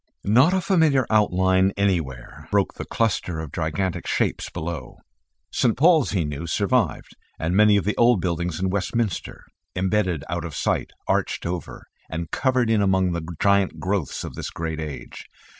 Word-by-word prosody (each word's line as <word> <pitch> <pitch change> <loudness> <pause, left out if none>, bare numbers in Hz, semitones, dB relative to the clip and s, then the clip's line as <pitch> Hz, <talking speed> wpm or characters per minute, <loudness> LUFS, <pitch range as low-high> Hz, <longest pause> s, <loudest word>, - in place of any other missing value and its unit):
Not 125 - +5
a 190 0 +1
familiar 160 - +3
outline 95 -2 +3
anywhere 80 -11 -2
broke - - +1
the - - -7
cluster 95 -7 -1
of 80 -4 -6
gigantic 80 +3 -2
shapes - - -1
below. 85 0 -6 0.5
St. 115 -3 +1
Paul's 160 -1 +5
he 90 -6 0
knew 75 +3 -5
survived, 105 +6 0 0.2
and 85 +3 -1
many 105 0 +6
of 100 - -1
the 105 - 0
old 120 -3 +5
buildings 85 -1 -2
in 95 0 0
Westminster, 100 0 -2 0.3
embedded 95 -4 0
out 85 0 -3
of 80 -3 -6
sight, - - -1 0.2
arched - - 0
over 85 0 -5 0.2
and 80 0 -5
covered 130 -3 +1
in 110 -2 +3
among 95 -2 +2
the 85 0 -2 0.2
giant 100 -1 +2
growths 95 -6 -2
of - - -6
this - - -5
great 80 -1 -4
age. 70 -6 -7
95 Hz, 160 wpm, -23 LUFS, 85-110 Hz, 0.5 s, many